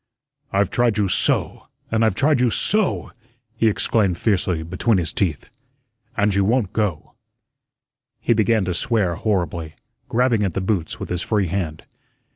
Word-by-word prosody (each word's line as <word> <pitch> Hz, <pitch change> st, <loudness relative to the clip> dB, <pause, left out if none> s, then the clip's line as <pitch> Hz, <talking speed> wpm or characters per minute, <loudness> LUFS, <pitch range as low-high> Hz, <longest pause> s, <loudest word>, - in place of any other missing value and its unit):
"I've 100 Hz, -1 st, +1 dB
tried 120 Hz, -3 st, +1 dB
you 105 Hz, -2 st, +2 dB
SO, 90 Hz, -, +1 dB, 0.2 s
and 110 Hz, 0 st, +2 dB
I've 110 Hz, -4 st, +2 dB
tried 145 Hz, +3 st, +2 dB
you 125 Hz, -, +3 dB
SO," 210 Hz, -, 0 dB, 0.4 s
he 115 Hz, -, +2 dB
exclaimed 100 Hz, -3 st, +1 dB
fiercely, 90 Hz, -6 st, 0 dB
between 95 Hz, +6 st, 0 dB
his 85 Hz, -3 st, -2 dB
teeth, 90 Hz, -, -1 dB, 0.7 s
"and 105 Hz, 0 st, +2 dB
you 100 Hz, 0 st, +2 dB
won't 110 Hz, -1 st, +1 dB
go." 100 Hz, -9 st, -2 dB, 1.1 s
He -, -, +2 dB
began 110 Hz, -2 st, +2 dB
to 90 Hz, -, -1 dB
swear 100 Hz, -1 st, 0 dB
horribly, 85 Hz, -5 st, -2 dB, 0.3 s
grabbing 120 Hz, -2 st, +2 dB
at 95 Hz, -5 st, -1 dB
the -, -, 0 dB
boots 95 Hz, -4 st, -2 dB
with -, -, -6 dB
his 90 Hz, 0 st, -2 dB
free 100 Hz, -5 st, 0 dB
hand. 85 Hz, -4 st, -3 dB
100 Hz, 155 wpm, -21 LUFS, 90-115 Hz, 1.1 s, you